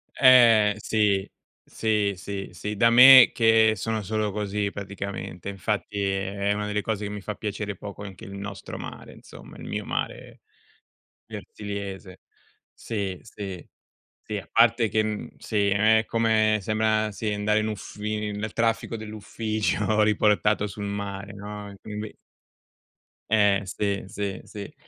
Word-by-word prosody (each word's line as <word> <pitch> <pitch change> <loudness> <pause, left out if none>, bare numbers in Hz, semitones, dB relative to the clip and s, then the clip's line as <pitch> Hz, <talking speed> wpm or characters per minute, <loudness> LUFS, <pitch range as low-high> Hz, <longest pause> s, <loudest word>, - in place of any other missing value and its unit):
Eh, 115 -5 +6
sì, 105 -3 +1 0.3
sì, 105 -2 0
sì, 100 +1 -6
sì, 105 +1 -5
da 115 +3 +4
me 125 +1 +9
che 115 -1 +4
sono 110 +2 -2
solo 105 0 -1
così, 105 0 -2
praticamente 100 -2 -7
e, - - -2
infatti, 100 +1 -3
è 100 +1 -1
una 105 0 -3
delle 105 0 -1
cose 105 -1 -3
che 100 - -5
mi 105 - -6
fa 105 +2 -5
piacere 105 -2 -4
poco 100 +1 -8
anche 95 -2 -10
il 100 - -9
nostro 100 0 -7
mare, - - -9
insomma, - - -14
il - - -10
mio - - -4
mare, - - -5 0.9
versigliese. 100 -3 -7 0.5
Sì, 100 -5 -4
sì, 100 -5 -8 0.5
sì, 105 - -5
a 90 -5 -7
parte 115 0 +4
che, 110 - +2
mhmm, 110 -1 -4
sì, 105 -2 0
è 110 +2 +4
come 110 -2 +2
sembra, 110 +1 +1
sì, 105 +1 -3
andare 105 +1 +1
in 110 - -1
uffi 105 0 -4
nel 105 +1 -4
traffico 115 0 0
dell' 110 -1 -8
ufficio 110 0 -1
riportato 105 0 +2
sul 100 0 -7
mare, 100 0 -5
no, 105 0 -8
e 100 - -12
quindi 105 0 -7 1.2
Eh, 100 -2 +4
sì, 100 +1 -2
sì, 100 -1 -4
sì. 100 -1 -9
105 Hz, 145 wpm, -25 LUFS, 100-110 Hz, 1.2 s, me